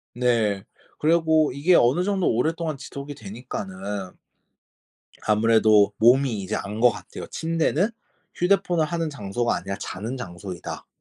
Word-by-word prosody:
네. 115 Hz, -5 st, +1 dB, 0.4 s
그리고 160 Hz, -1 st, +3 dB
이게 160 Hz, +6 st, +3 dB
어느 135 Hz, +8 st, +4 dB
정도 195 Hz, -2 st, 0 dB
오랫동안 155 Hz, +5 st, 0 dB
지속이 140 Hz, +1 st, -8 dB
되니까는 100 Hz, -4 st, -6 dB, 1.2 s
아무래도 110 Hz, -1 st, +4 dB
몸이 120 Hz, -1 st, +4 dB
이제 95 Hz, -, -3 dB
안 105 Hz, +2 st, -5 dB
것 125 Hz, +1 st, +6 dB
같아요. -, -, -8 dB
'침대는 165 Hz, +3 st, 0 dB, 0.5 s
휴대폰을 175 Hz, -3 st, +2 dB
하는 165 Hz, -1 st, -2 dB
장소가 120 Hz, -1 st, -1 dB
아니라 100 Hz, 0 st, -4 dB
자는 110 Hz, +6 st, -5 dB
장소이다.' 90 Hz, -6 st, -7 dB
125 Hz, 300 characters per minute, -24 LUFS, 105-160 Hz, 1.2 s, 것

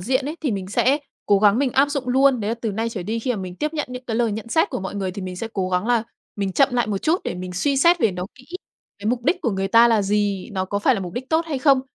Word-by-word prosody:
diện 260 Hz, +8 st, 0 dB
ấy, 310 Hz, +3 st, -4 dB
thì 285 Hz, -, 0 dB
mình 190 Hz, -2 st, -4 dB
sẽ 265 Hz, +7 st, +2 dB, 0.3 s
cố 200 Hz, -1 st, +4 dB
gắng 205 Hz, +2 st, +4 dB
mình 275 Hz, -2 st, +1 dB
áp 275 Hz, +2 st, +4 dB
dụng 275 Hz, -4 st, -3 dB
luôn. 265 Hz, -1 st, +4 dB
Đấy 205 Hz, -, -2 dB
là 230 Hz, -, 0 dB
từ 230 Hz, -2 st, -4 dB
nay 225 Hz, +3 st, -1 dB
trở 205 Hz, -6 st, -5 dB
đi 220 Hz, +5 st, -2 dB
khi 250 Hz, +3 st, -2 dB
mà 235 Hz, -, 0 dB
mình 180 Hz, -1 st, -7 dB
tiếp 300 Hz, +1 st, -2 dB
nhận 300 Hz, -, -2 dB
những 250 Hz, 0 st, -7 dB
cái 225 Hz, -2 st, -3 dB
lời 235 Hz, -3 st, +1 dB
nhận 220 Hz, +2 st, -6 dB
xét 320 Hz, +7 st, +2 dB
của -, -, -3 dB
mọi 190 Hz, +1 st, -5 dB
người 190 Hz, -2 st, -2 dB
thì 195 Hz, +1 st, -7 dB
mình 185 Hz, -1 st, -6 dB
sẽ 225 Hz, +4 st, -4 dB
cố 185 Hz, -2 st, -1 dB
gắng 180 Hz, +3 st, 0 dB
là 240 Hz, -2 st, +2 dB, 0.3 s
mình 195 Hz, -2 st, -2 dB
chậm 275 Hz, +6 st, +4 dB
lại 240 Hz, -3 st, +1 dB
một 200 Hz, -2 st, -1 dB
chút 330 Hz, -, +1 dB
để -, -, -3 dB
mình 180 Hz, 0 st, -6 dB
suy 275 Hz, +10 st, 0 dB
xét 340 Hz, +5 st, +5 dB
về 220 Hz, -, +3 dB
nó 180 Hz, 0 st, -5 dB
kỹ, 255 Hz, -2 st, -17 dB, 0.5 s
cái 205 Hz, -, -6 dB
mục 240 Hz, +1 st, 0 dB
đích -, -, +2 dB
của 235 Hz, -, 0 dB
người 195 Hz, -1 st, -2 dB
ta 230 Hz, +2 st, +6 dB
là 220 Hz, -3 st, +3 dB
gì, 205 Hz, -1 st, 0 dB
nó 190 Hz, -1 st, -1 dB
có 200 Hz, +2 st, -2 dB
phải 255 Hz, +5 st, +3 dB
là 200 Hz, -, -3 dB
mục 180 Hz, -2 st, -6 dB
đích 255 Hz, +3 st, -6 dB
tốt 325 Hz, +1 st, +2 dB
hay 285 Hz, -4 st, -2 dB
không. 275 Hz, -2 st, +4 dB
225 Hz, 325 wpm, -22 LUFS, 195-260 Hz, 0.5 s, ta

